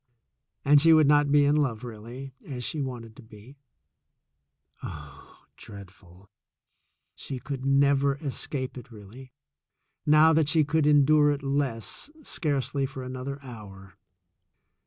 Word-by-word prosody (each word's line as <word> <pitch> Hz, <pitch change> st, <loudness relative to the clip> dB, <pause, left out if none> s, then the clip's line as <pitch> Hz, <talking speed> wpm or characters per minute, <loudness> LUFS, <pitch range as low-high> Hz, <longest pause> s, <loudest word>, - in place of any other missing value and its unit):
And 145 Hz, 0 st, +6 dB
she 165 Hz, +1 st, +6 dB
would 155 Hz, -1 st, +5 dB
not 145 Hz, 0 st, +3 dB
be 145 Hz, 0 st, +5 dB
in 145 Hz, +1 st, +3 dB
love 130 Hz, -7 st, -1 dB
really, 120 Hz, +4 st, -9 dB
as 125 Hz, -4 st, -7 dB
she 150 Hz, +4 st, -3 dB
wanted 120 Hz, -4 st, -7 dB
to -, -, -12 dB
be. 110 Hz, +5 st, -16 dB, 1.2 s
Oh, 70 Hz, -2 st, -11 dB
dreadful! 95 Hz, -2 st, -14 dB, 0.9 s
She 135 Hz, -, -7 dB
could 135 Hz, +1 st, -6 dB
never 140 Hz, 0 st, +3 dB
escape 135 Hz, -2 st, -5 dB
it 125 Hz, +1 st, -14 dB
really, 115 Hz, +5 st, -13 dB, 0.7 s
now 155 Hz, +2 st, +5 dB
that 155 Hz, -2 st, +2 dB
she 160 Hz, -2 st, +3 dB
could 155 Hz, 0 st, +1 dB
endure 150 Hz, 0 st, +5 dB
it 145 Hz, -1 st, -2 dB
less, 135 Hz, -, -2 dB
scarcely 140 Hz, -, -2 dB
for 135 Hz, -1 st, -8 dB
another 130 Hz, +2 st, -6 dB
hour. 100 Hz, -6 st, -12 dB
135 Hz, 130 wpm, -26 LUFS, 115-145 Hz, 1.2 s, And